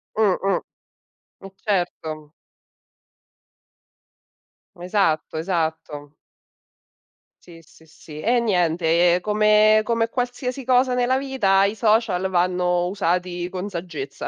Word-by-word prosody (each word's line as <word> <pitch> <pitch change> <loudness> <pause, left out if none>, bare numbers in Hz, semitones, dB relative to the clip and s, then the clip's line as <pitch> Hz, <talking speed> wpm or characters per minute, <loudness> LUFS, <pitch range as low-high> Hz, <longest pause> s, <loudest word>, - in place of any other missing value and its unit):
Mh, 210 -4 +2
mh. 195 - +1 0.8
Eh 195 - -10
certo. 160 -7 -3 2.4
Esatto, 175 -4 -1
esatto. 160 -4 -3 1.3
Sì, 170 -1 -14
sì, 160 0 -22
sì. 155 -1 -13
E 240 +8 +1
niente, 175 -4 +2
ehm, 175 - +1
come 215 +1 +4
come 230 0 0
qualsiasi 250 +1 -4
cosa 255 0 +2
nella 250 +1 +1
vita 240 -8 +2
i 205 - -1
social 215 -4 +1
vanno 180 -1 +1
usati 180 -2 -2
con 185 +2 -5
saggezza 160 -7 -6
185 Hz, 100 wpm, -22 LUFS, 170-215 Hz, 2.4 s, come